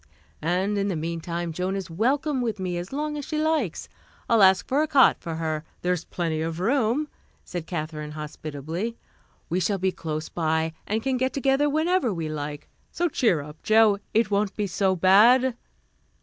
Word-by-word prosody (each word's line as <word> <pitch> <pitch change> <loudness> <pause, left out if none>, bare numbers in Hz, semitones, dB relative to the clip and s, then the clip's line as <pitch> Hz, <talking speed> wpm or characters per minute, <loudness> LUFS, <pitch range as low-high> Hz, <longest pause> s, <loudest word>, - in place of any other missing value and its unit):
"And 185 +6 0
in 200 - 0
the 190 - -1
mean 165 +1 -3
time, 170 0 -3
Joan 185 +3 -2
is 190 -4 -5
welcome 265 - +1
with 225 -4 -2
me 180 -2 -2
as 175 +2 -7
long 300 +2 -2
as 285 - -6
she 310 - -3
likes. 305 - 0 0.4
I'll 230 -2 +4
ask 190 -1 +5
for 275 +3 +2
a 310 - +1
cot 280 -4 +5
for 165 -3 -5
her. 160 -1 -2 0.2
There's 180 -1 0
plenty 165 -3 -2
of 165 +1 -3
room," 245 +6 +1 0.4
said 175 -3 -6
Katherine 155 -3 -4
hospitably. 155 +7 -5 0.5
"We 175 - 0
shall 195 +3 0
be 190 0 0
close 155 -2 -4
by 160 -1 -1
and 220 +2 -1
can 265 -1 0
get 260 +1 0
together 275 +2 +2
whenever 315 -3 +1
we 165 -4 -3
like. 145 -1 -5 0.2
So 345 0 0
cheer 220 - +2
up, 150 +2 -11
Jo, 215 -2 +4
it 220 -2 +2
won't 200 0 +1
be 210 - -1
so 190 0 +1
bad." 230 +8 +5
190 Hz, 185 wpm, -25 LUFS, 165-250 Hz, 0.5 s, ask